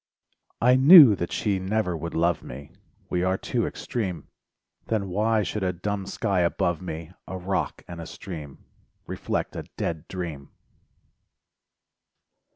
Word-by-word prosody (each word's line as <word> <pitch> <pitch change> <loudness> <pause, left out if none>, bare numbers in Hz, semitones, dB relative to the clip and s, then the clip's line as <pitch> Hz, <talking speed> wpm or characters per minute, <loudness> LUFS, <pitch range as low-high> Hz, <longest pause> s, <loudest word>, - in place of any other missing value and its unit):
I 125 +2 +5
knew 140 - +10
that 85 - -3
she 100 -3 0
never 95 -1 -1
would 85 +1 -5
love 85 +1 +1
me,— 70 +3 -10 0.4
We 90 - +1
are 95 +1 +1
too - - -1
extreme— 95 - -4 0.6
Then 105 -4 -1
why 110 +3 +1
should 105 +2 -3
a 95 -1 +1
dumb 100 +2 -4
sky 100 -1 -1
above 85 0 0
me, 85 -2 -6 0.2
A 95 - -5
rock 95 +2 -2
and 85 -1 -7
a 85 - -8
stream 80 -8 -9 0.4
Reflect - - -3
a - - -5
dead 80 0 -3
dream? 85 -7 -6
90 Hz, 140 wpm, -25 LUFS, 85-105 Hz, 0.6 s, knew